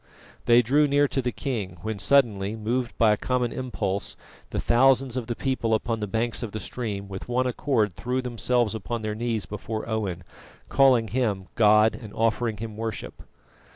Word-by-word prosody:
They 120 +1 +6
drew 145 +6 +3
near 145 +1 +3
to 135 - 0
the 125 0 -1
king, 105 -11 -4
when 110 -2 -3
suddenly, 105 -3 +2
moved 120 +3 -2
by 110 -2 +5
a - - -1
common 125 0 0
impulse, 100 -6 -3 0.3
the - - -3
thousands 130 +1 +3
of 125 -3 -3
the 120 - -2
people 115 -4 0
upon 115 +1 -2
the 105 - -3
banks 115 +4 -1
of 115 -4 -5
the 110 - -3
stream 105 -4 -4
with 95 +4 -8
one 125 +1 +1
accord 120 -5 0
threw 125 +8 -2
themselves 120 -2 0
upon 115 +1 -4
their 110 0 -2
knees 115 -1 -2
before 110 +2 -5
Owen, 100 -6 -2 0.5
calling 130 -5 +4
him 105 -7 -1
God 110 0 +5
and 110 -6 -10
offering 115 0 0
him 110 0 -6
worship. 115 0 -5
115 Hz, 180 wpm, -25 LUFS, 105-125 Hz, 0.5 s, They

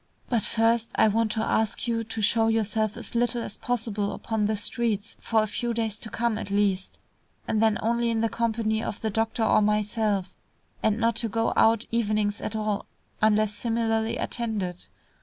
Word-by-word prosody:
"But 235 -3 +2
first, 230 +2 +2
I - - +5
want 220 +1 +1
to 220 - -1
ask 220 +2 0
you 230 -1 0
to 225 0 -5
show 225 +2 +3
yourself 220 -1 0
as 235 - -6
little 240 0 0
as 210 - -8
possible 220 -4 -1
upon 220 -2 -1
the 215 - 0
streets, 220 0 -1
for 220 -1 +2
a - - 0
few 235 +2 -2
days 220 -2 -1
to 220 - -8
come 230 0 -1
at 200 - -6
least, 200 -2 0 0.5
and 220 - +1
then 220 -1 +3
only 235 +1 +1
in 225 -1 0
the 225 - +3
company 220 -1 0
of 210 - -4
the 220 - -1
doctor 225 +2 0
or 220 - +4
myself, 210 -2 0 0.5
and 215 -1 +2
not 230 -1 +1
to 230 -1 -2
go 225 +3 0
out 225 0 +4
evenings 210 -2 0
at 215 - -4
all 215 -1 -2 0.3
unless 215 -1 +3
similarly 225 0 0
attended. 205 -7 -3
220 Hz, 185 wpm, -26 LUFS, 210-230 Hz, 0.5 s, I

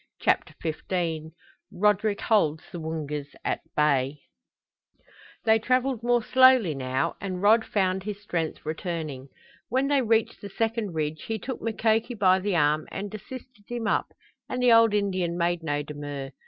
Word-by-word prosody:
CHAPTER - - +1
XV 160 -1 -3 0.4
RODERICK 210 +2 +1
HOLDS 160 -9 +2
THE 175 - -6
WOONGAS 150 -3 -5
AT - - -1
BAY 140 -1 +1 1.2
They 220 0 +5
traveled 255 +1 +1
more 240 0 +2
slowly 255 -9 +5
now 130 0 -1
and 185 -2 -4
Rod 220 +2 +5
found 190 -3 0
his 205 +1 -5
strength 170 -6 -3
returning. 155 -5 -4 0.4
When 265 +4 +1
they 285 -2 +3
reached 225 -2 +1
the 200 - -7
second 225 -2 -2
ridge 155 0 -3
he 225 - -1
took 255 +3 -6
Mukoki 225 +1 0
by 190 -3 +4
the 195 0 -1
arm 150 -1 +2
and 200 +1 -6
assisted 230 0 -10
him 240 -2 -3
up, - - +1 0.4
and 250 - -3
the 250 -2 +5
old 230 -2 +6
Indian 185 -4 0
made 175 0 0
no 145 -2 -1
demur. 145 -2 -6
190 Hz, 155 wpm, -26 LUFS, 155-225 Hz, 1.2 s, old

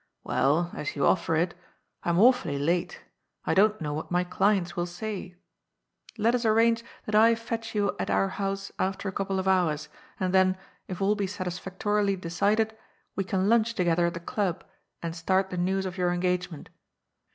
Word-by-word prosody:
" - - -54
Well, 160 +6 +1
as 150 - -4
you 140 - +1
offer 165 -3 +2
ii 175 +3 +2 0.5
I'm 170 0 +1
awfully 235 - +4
late. 170 +5 -1 0.4
I - - +1
don't 210 +2 +4
know 150 -2 -3
what 155 - -5
my 180 0 +1
clients 185 -1 +1
will 175 0 -1
say. 185 0 -6 0.8
Let 225 +2 +2
us 250 -1 0
arrange 230 +1 +3 0.2
that 215 - -5
I 225 +2 +6
fetch 230 0 -5
you 205 -1 +1
at - - -2
our 195 - +2
house 195 0 -3
after 195 +1 -1
a - - -1
couple 195 0 -2
of 190 0 -2
hours, 160 -5 +1 0.3
and 185 -1 -1
then, 185 0 +4 0.3
if 185 +1 -4
all 200 +2 +3
be 205 -2 -1
sat 190 -1 -5
isfactorily 195 +3 -1
decided, 205 +6 +1 0.4
we 195 - 0
can 190 0 0
lunch 230 +1 +3
together 175 -1 +2
at 170 - -3
the - - -4
Club 190 -1 -2 0.4
and 165 -1 -3
start 190 +3 +1
the 180 - -4
news 190 +2 0
of 185 0 -5
your 180 -1 +2
engagement. 180 -2 -2
190 Hz, 185 wpm, -27 LUFS, 175-210 Hz, 0.8 s, I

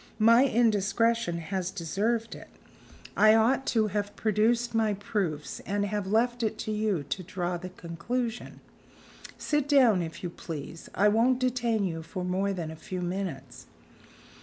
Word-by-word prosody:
"My 230 +4 +6
indiscretion 230 -4 +2
has 180 +2 -3
deserved 205 +6 -2
it. - - -11 0.7
I 215 0 +6
ought 245 +5 +2
to 220 -2 +2
have 205 +1 -3
produced 230 +3 +1
my 220 -2 +2
proofs, 190 -7 -3
and 205 +1 -2
have 205 -1 -3
left 240 +4 +1
it 220 - -1
to 215 - -4
you 210 -7 0
to 165 +6 -4
draw 180 0 -3
the 180 +2 -7
conclusion. 225 +8 -4 0.8
Sit 295 -2 -1
down, 250 -10 +5
if 165 +1 -6
you 175 - -3
please. 165 -1 -8
I 205 - +4
won't 230 +4 +3
detain 240 -4 0
you 165 -3 -3
for 180 +3 -6
more 190 +2 0
than 170 -5 -4
a - - -8
few 180 +3 -6
minutes." 175 -9 -5
205 Hz, 155 wpm, -28 LUFS, 180-230 Hz, 0.8 s, My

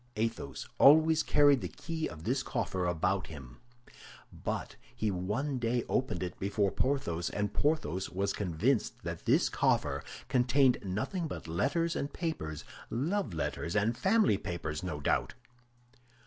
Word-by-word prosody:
Athos 110 -10 -3
always 160 +2 +7
carried 145 -2 +4
the - - -3
key 160 -1 -4
of 75 +1 -10
this 130 +7 0
coffer 95 -8 -2
about 90 +3 0
him; 65 -6 -10 0.8
but - - -4 0.2
he 110 -1 0
one 110 +10 -2
day 120 0 0
opened 130 -6 -1
it 90 - -5
before 100 0 +1
Porthos, 90 -12 0
and 105 -1 -2
Porthos 145 - 0
was 100 +2 -1
convinced 105 - 0
that - - -5
this - - +4
coffer - - +1 0.2
contained 130 +1 +3
nothing 110 - -2
but 150 - -7
letters 165 - 0
and 140 - -2
papers—love 145 - -3
letters 85 +2 -3
and 110 +3 +2
family 195 - +3
papers, 80 -3 -4
no 85 -5 -4
doubt. 70 - 0
110 Hz, 135 wpm, -31 LUFS, 90-140 Hz, 0.8 s, always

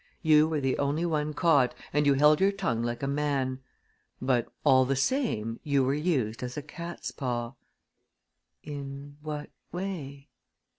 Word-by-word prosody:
You 155 -1 +6
were 160 -2 -1
the 135 -2 0
only 145 +4 0
one 150 -2 -1
caught 140 -7 +3 0.2
and 150 0 +3
you 140 - +5
held 150 +3 +5
your 195 +1 +5
tongue 180 - -1
like 120 +2 -3
a - - 0
man; 140 -2 0 0.6
but, 125 -2 0
all 130 -3 +6
the 135 +2 0
same, 135 - 0
you 140 -2 +2
were 130 +1 +2
used 140 -7 0
as 125 +1 -5
a 145 - -3
cat's 170 +3 -6
paw." 120 -3 -3 1.1
"In 140 -1 -7
what 150 -1 -5 0.2
way?" 155 -7 -5
140 Hz, 155 wpm, -28 LUFS, 130-155 Hz, 1.1 s, You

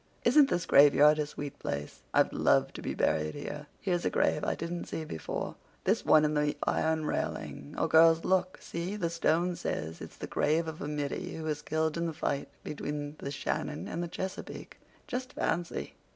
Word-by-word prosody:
Isn't 295 -2 +6
this 175 - 0
graveyard 150 +1 +7
a 150 - 0
sweet 145 -1 -7
place? 70 0 -4
I'd - - +3
love - - +3
to - - -7
be - - -3
buried 75 0 +1
here. - - -6
Here's 175 -2 0
a - - +2
grave 150 - +1
I - - 0
didn't 170 +1 -4
see 160 - -4
before—this 80 - -3
one 155 -1 +6
in 150 - +1
the 150 0 +1
iron 160 -1 +1
railing—oh, 70 - -3
girls, 165 0 +6
look, 185 0 +1
see—the 170 +1 -3
stone 170 +1 +1
says 80 - -4
it's - - -9
the - - -5
grave 160 +2 +1
of 160 0 -6
a - - -3
middy 150 +5 -3
who 160 - -5
was 150 -1 -2
killed 160 +1 0
in 170 0 0
the 165 - -3
fight 140 -2 -2 0.2
between 145 0 -4
the 140 - -4
Shannon 145 +1 -3
and 170 - -3
the 175 - -2
Chesapeake. 190 +2 -6 0.3
Just 255 +1 -4
fancy!" 175 -1 -2
160 Hz, 180 wpm, -30 LUFS, 145-170 Hz, 0.3 s, graveyard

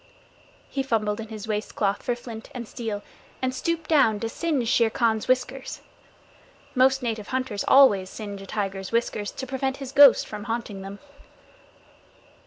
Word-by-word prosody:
He 275 - -1
fumbled 220 -5 0
in 225 - -6
his 215 0 -8
waist 210 -1 -3
cloth 200 -1 0
for 245 - -1
flint 230 -2 -9
and 240 -2 -5
steel, 215 -4 -5 0.4
and 260 0 -1
stooped 330 +3 -2
down 250 -9 +4
to 225 - -2
singe 290 -4 -1
Shere 230 0 +3
Khan's 220 -1 0
whiskers. 255 +1 -1 0.9
Most 265 0 +3
native 225 -3 -3
hunters 255 -6 -2
always 205 -9 +6
singe 205 -2 -7
a 195 - -10
tiger's 195 -2 -3
whiskers 230 -3 -1
to 265 - -5
prevent 265 +1 -2
his 270 -2 -7
ghost 280 -2 +7
from 210 0 -7
haunting 225 -4 -4
them. 195 +1 -8
230 Hz, 160 wpm, -25 LUFS, 210-260 Hz, 0.9 s, ghost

